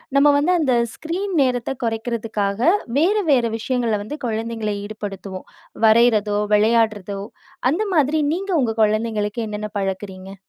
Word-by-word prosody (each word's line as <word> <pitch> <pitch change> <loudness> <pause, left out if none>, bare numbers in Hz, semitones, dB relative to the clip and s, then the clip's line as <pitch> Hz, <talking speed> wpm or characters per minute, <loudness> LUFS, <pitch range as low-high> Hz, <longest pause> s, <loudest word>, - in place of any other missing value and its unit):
நம்ம 280 +1 +6
வந்து 300 +5 +2
அந்த 275 -5 +2 0.2
ஸ்க்ரீன் 370 +5 -4
நேரத்த 250 -1 0
குறைக்கிறதுக்காக, 225 -2 -2 0.4
வேற 355 +6 +3 0.2
வேற 250 -4 +4
விஷயங்கள 235 -1 -1
வந்து 290 +9 -6
குழந்தைங்கள 225 -1 -2
ஈடுபடுத்துவோம். 200 -3 -7 0.4
வரையிறதோ, 220 -2 +4 0.2
விளையாட்றதோ 210 -2 +1 0.5
அந்த 355 +9 0
மாதிரி 300 0 +3
நீங்க 390 +3 -3
உங்க 225 -3 0
குழந்தைங்களுக்கு 215 0 0
என்னென்ன 210 0 -5
பழக்குறீங்க? 190 0 -5
225 Hz, 120 wpm, -21 LUFS, 210-255 Hz, 0.5 s, நம்ம